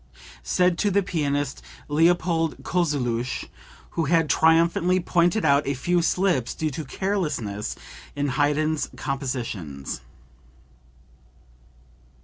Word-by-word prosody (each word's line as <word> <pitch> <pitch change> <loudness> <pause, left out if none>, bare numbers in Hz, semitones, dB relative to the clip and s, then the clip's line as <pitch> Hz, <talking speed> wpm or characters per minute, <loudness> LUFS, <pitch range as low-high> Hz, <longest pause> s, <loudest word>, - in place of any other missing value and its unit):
(Said 180 -1 +1
to 205 - +2
the 200 +1 +2
pianist 145 -6 -1 0.3
Leopold 165 +1 +2
Kozeluch 135 -8 -1 0.5
who 165 - -1
had 160 0 +2
triumphantly 170 +3 +3
pointed 175 +3 +2
out 140 0 +3
a 140 - 0
few 175 +7 +1
slips 175 -8 +1
due 155 -1 -2
to 155 +4 -5
carelessness 150 - -2 0.4
in 145 0 -1
Haydn's 150 +3 +1
compositions.) 115 - -4
155 Hz, 100 wpm, -24 LUFS, 135-175 Hz, 0.5 s, triumphantly